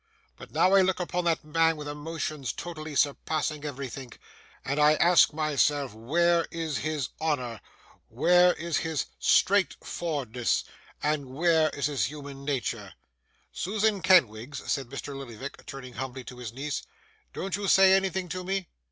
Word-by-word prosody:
But, - - -12
now, 185 +1 +3
I 195 - +7
look 185 0 +1
upon 180 0 -2
that 165 -1 +1
man 165 +1 +2
with 150 -1 -7
emotions 150 -3 -4
totally 155 -3 -7
surpassing 150 +2 0
everythink, 135 -3 -6 0.5
and 140 +2 -1
I 150 +1 +6
ask 175 +1 +5
myself 145 -4 +1
where 170 +9 +2
is 160 -4 -3
his 155 -4 -2
Honour, 125 -9 -1 0.5
where 180 0 +5
is 170 -1 -2
his 160 -3 -1
straight 200 0 +3
for'ardness, 130 -8 -1 0.4
and 150 -2 0
where 160 +3 +3
is 140 - -3
his 145 -2 +1
human 140 -1 -8
natur?' 120 -8 -3 0.6
'Susan 210 +1 0
Kenwigs,' 140 - +3
said 135 -3 -1
Mr. 140 +1 -6
Lillyvick, 135 0 -8
turning 130 -3 -8
humbly 130 +1 -5
to 125 0 -10
his 120 -3 -6
niece, 140 +4 -4 0.5
'don't 195 -1 -3
you 200 0 -3
say 190 0 +7
anything 190 -1 +1
to 185 +1 -4
me? 190 -1 -2
150 Hz, 150 wpm, -28 LUFS, 135-175 Hz, 0.6 s, I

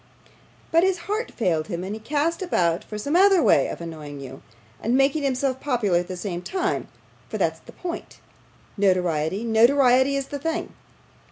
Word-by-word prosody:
'But 330 - +5
his 375 -1 +1
heart 430 +4 -2
failed 165 -8 0
him, 170 +1 -4
and 195 +2 -4
he 220 - -6
cast 300 - -1
about 175 - +1
for 210 - -7
some 285 +9 -2
other 385 -1 +6
way - - +4
of - - -6
annoying 155 -4 -7
you, 135 0 -9 0.4
and 235 +4 +1
making 275 +3 +2
himself 265 -1 0
popular 230 -11 +1
at 175 - -4
the 185 0 -6
same 175 -1 -4
time 370 - -2 0.4
for - - -3
that's - - 0
the - - -14
point. 350 -2 -7 0.6
Notoriety, 185 -1 +1
notoriety, 255 +3 +4
is 275 -1 -3
the 285 - -4
thing. 325 +4 -3
245 Hz, 175 wpm, -24 LUFS, 180-295 Hz, 0.6 s, other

